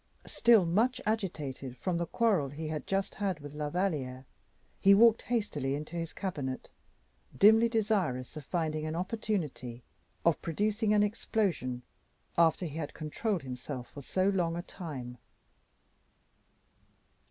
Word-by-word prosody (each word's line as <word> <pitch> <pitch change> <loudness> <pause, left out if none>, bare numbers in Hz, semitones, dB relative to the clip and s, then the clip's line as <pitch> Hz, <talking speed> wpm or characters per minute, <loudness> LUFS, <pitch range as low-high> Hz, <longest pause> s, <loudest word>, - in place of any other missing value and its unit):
Still 230 -6 +5
much 225 +9 +2
agitated 150 - -3
from 175 +2 -1
the 170 - -1
quarrel 200 - +2
he 155 +3 -5
had 155 -1 -4
just 195 0 0
had 195 -5 -2
with 145 0 -9
La 150 0 -3
Valliere, 145 -8 -2 0.5
he 195 0 +7
walked 225 +1 +6
hastily 155 - -1
into 150 +3 -6
his 165 -1 -3
cabinet, 145 -9 -4 0.7
dimly 220 +3 +7
desirous 200 - 0
of 155 - -6
finding 155 0 -1
an 155 - -3
opportunity 175 - -3 0.4
of 170 -2 +3
producing 210 +5 0
an 210 -1 +5
explosion 190 - -1 0.5
after 170 +1 +3
he 155 -1 -5
had 150 -3 -5
controlled 170 +4 -2
himself 125 0 -6
for 145 - -9
so 185 +7 0
long 175 -4 0
a 175 - -4
time. 130 -11 -7
170 Hz, 135 wpm, -31 LUFS, 145-205 Hz, 0.7 s, he